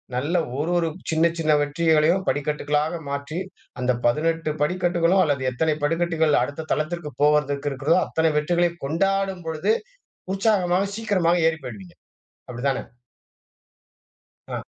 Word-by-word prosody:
நல்ல 150 Hz, +8 st, 0 dB, 0.2 s
ஒரு 165 Hz, +4 st, -1 dB
ஒரு 165 Hz, -1 st, +1 dB, 0.2 s
சின்ன 160 Hz, +1 st, +3 dB
சின்ன 155 Hz, -1 st, +2 dB
வெற்றிகளையும் 160 Hz, +4 st, +2 dB
படிக்கட்டுகளாக 150 Hz, +2 st, -1 dB
மாற்றி, 140 Hz, +3 st, -4 dB, 0.4 s
அந்த 125 Hz, 0 st, +1 dB
18 160 Hz, +5 st, +1 dB
படிக்கட்டுகளும் 175 Hz, +2 st, +2 dB
அல்லது 140 Hz, -3 st, 0 dB
எத்தனை 155 Hz, +4 st, 0 dB
படிக்கட்டுகள் 160 Hz, -3 st, +2 dB
அடுத்த 145 Hz, +4 st, -6 dB
தளத்திற்கு 155 Hz, 0 st, -3 dB
போவதற்கு 145 Hz, -1 st, +2 dB
இருக்கிறதோ 150 Hz, +7 st, +2 dB
அத்தனை 160 Hz, -1 st, +1 dB
வெற்றிகளை 175 Hz, +2 st, +1 dB
கொண்டாடும் 195 Hz, +3 st, 0 dB
பொழுது 160 Hz, +7 st, +1 dB, 0.6 s
உற்சாகமாக, 195 Hz, -3 st, +2 dB
சீக்கிரமாக 180 Hz, -6 st, +1 dB
ஏறி 160 Hz, 0 st, 0 dB
போய்டுவீங்க. 100 Hz, -7 st, -9 dB, 0.5 s
அப்படித்தான? 130 Hz, +3 st, -1 dB, 1.7 s
ஆ -, -, -4 dB
160 Hz, 115 wpm, -23 LUFS, 145-175 Hz, 1.7 s, சின்ன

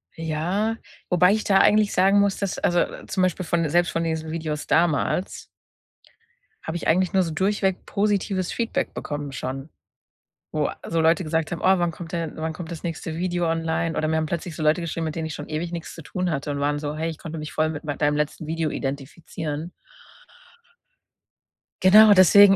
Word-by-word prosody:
Ja, 175 Hz, +8 st, -1 dB, 0.3 s
wobei 180 Hz, +1 st, +5 dB
ich 215 Hz, -, 0 dB
da 195 Hz, -, +3 dB
eigentlich 210 Hz, +1 st, +4 dB
sagen 195 Hz, +2 st, +4 dB
muss, 200 Hz, -1 st, +2 dB
dass 200 Hz, -2 st, -2 dB
also, 175 Hz, 0 st, +2 dB, 0.3 s
zum 185 Hz, -, 0 dB
Beispiel 185 Hz, 0 st, 0 dB
von 165 Hz, -1 st, +1 dB
selbst 175 Hz, +3 st, +2 dB
von 165 Hz, -, -1 dB
diesen 160 Hz, -1 st, -2 dB
Videos 155 Hz, -2 st, -4 dB
damals 170 Hz, +2 st, +1 dB, 1.2 s
habe 160 Hz, +2 st, -3 dB
ich -, -, -5 dB
eigentlich 185 Hz, +4 st, +2 dB
nur 190 Hz, -1 st, +4 dB
so 165 Hz, -, -3 dB
durchweg 190 Hz, +2 st, 0 dB
positives 200 Hz, -3 st, 0 dB
Feedback 235 Hz, -1 st, -2 dB
bekommen 145 Hz, -2 st, -5 dB
schon, 135 Hz, +3 st, -5 dB, 0.8 s
wo 155 Hz, -1 st, 0 dB, 0.2 s
so 165 Hz, -, 0 dB
Leute 165 Hz, +3 st, +3 dB
gesagt 160 Hz, 0 st, -1 dB
haben: 170 Hz, -, -3 dB
„Oh, 190 Hz, 0 st, +4 dB
wann 175 Hz, -1 st, +1 dB
kommt 165 Hz, 0 st, -9 dB
denn 165 Hz, -3 st, -2 dB
wann 160 Hz, 0 st, -3 dB
kommt 160 Hz, 0 st, -7 dB
das 165 Hz, -, -7 dB
nächste 165 Hz, -1 st, -4 dB
Video 175 Hz, 0 st, -1 dB
online?“ 165 Hz, 0 st, -1 dB
Oder 155 Hz, -, 0 dB
mir 160 Hz, -, +1 dB
haben 160 Hz, 0 st, 0 dB
plötzlich 170 Hz, +1 st, -4 dB
so 160 Hz, -, -4 dB
Leute 155 Hz, +3 st, +3 dB
geschrieben, 165 Hz, -1 st, -3 dB
mit 155 Hz, -1 st, -3 dB
denen 160 Hz, -1 st, -3 dB
ich 155 Hz, -, -5 dB
schon 145 Hz, -, -7 dB
ewig 160 Hz, +3 st, -3 dB
nichts 170 Hz, -2 st, -6 dB
zu 165 Hz, -, -10 dB
tun 180 Hz, +4 st, -2 dB
hatte 145 Hz, -1 st, -3 dB
und 140 Hz, 0 st, -2 dB
waren 145 Hz, +1 st, 0 dB
so: 145 Hz, 0 st, -4 dB
„Hey, 160 Hz, +1 st, -2 dB
ich 160 Hz, -, -9 dB
konnte 165 Hz, -1 st, -7 dB
mich 155 Hz, 0 st, -6 dB
voll 155 Hz, 0 st, +1 dB
mit 155 Hz, 0 st, -6 dB
mei 145 Hz, -1 st, -2 dB
deinem 150 Hz, 0 st, +1 dB
letzten 150 Hz, +1 st, -2 dB
Video 160 Hz, 0 st, -1 dB
identifizieren.“ 150 Hz, +4 st, -5 dB, 2.1 s
Genau, 210 Hz, +3 st, +8 dB
deswegen. 195 Hz, +1 st, +8 dB
165 Hz, 195 wpm, -24 LUFS, 155-185 Hz, 2.1 s, Genau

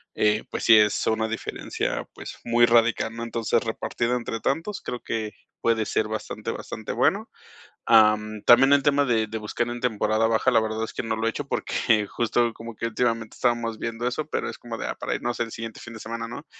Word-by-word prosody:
eh, 105 Hz, 0 st, +2 dB
pues -, -, -4 dB
sí 115 Hz, -, +8 dB
es 105 Hz, -1 st, +3 dB
una 110 Hz, 0 st, +1 dB
diferencia, 115 Hz, 0 st, -3 dB
pues, -, -, -8 dB
muy 120 Hz, 0 st, +4 dB
radical, 115 Hz, -1 st, +2 dB
¿no? 115 Hz, -, -5 dB
Entonces, 115 Hz, 0 st, 0 dB
repartido 115 Hz, +2 st, -1 dB
entre 115 Hz, -2 st, -3 dB
tantos, 165 Hz, -, -2 dB
creo 125 Hz, -, -5 dB
que 110 Hz, -2 st, -3 dB, 0.3 s
puede 115 Hz, -1 st, +2 dB
ser 110 Hz, -, 0 dB
bastante, 110 Hz, 0 st, -4 dB
bastante -, -, -6 dB
bueno. -, -, +1 dB, 0.6 s
Am, 110 Hz, -1 st, +4 dB
también 135 Hz, +3 st, +7 dB
el 140 Hz, -, +3 dB
tema 145 Hz, 0 st, +3 dB
de 115 Hz, -3 st, +2 dB
de 110 Hz, +1 st, -4 dB
buscar 110 Hz, +2 st, -2 dB
en 120 Hz, 0 st, -5 dB
temporada 110 Hz, -2 st, +1 dB
baja, 115 Hz, +3 st, +2 dB
la 115 Hz, -, +4 dB
verdad 110 Hz, 0 st, -2 dB
es -, -, -7 dB
que -, -, -4 dB
no 115 Hz, -1 st, -2 dB
lo 110 Hz, +1 st, -1 dB
he -, -, +3 dB
hecho 140 Hz, +4 st, -5 dB
porque 110 Hz, -3 st, +1 dB
justo 120 Hz, 0 st, +1 dB
como 115 Hz, 0 st, -9 dB
que 115 Hz, -, -2 dB
últimamente 115 Hz, -1 st, -1 dB
estábamos 120 Hz, -2 st, 0 dB
viendo 115 Hz, +1 st, -3 dB
eso, 145 Hz, +5 st, -3 dB
pero -, -, -2 dB
es -, -, -10 dB
como -, -, -7 dB
de, -, -, -4 dB
ah, -, -, -4 dB
para -, -, -3 dB
irnos 120 Hz, 0 st, -3 dB
el 115 Hz, -1 st, -1 dB
siguiente 115 Hz, -1 st, -7 dB
fin 115 Hz, -, -10 dB
de 110 Hz, -, -9 dB
semana, 115 Hz, +1 st, -5 dB
¿no? 120 Hz, +6 st, -8 dB
115 Hz, 215 wpm, -25 LUFS, 110-120 Hz, 0.6 s, sí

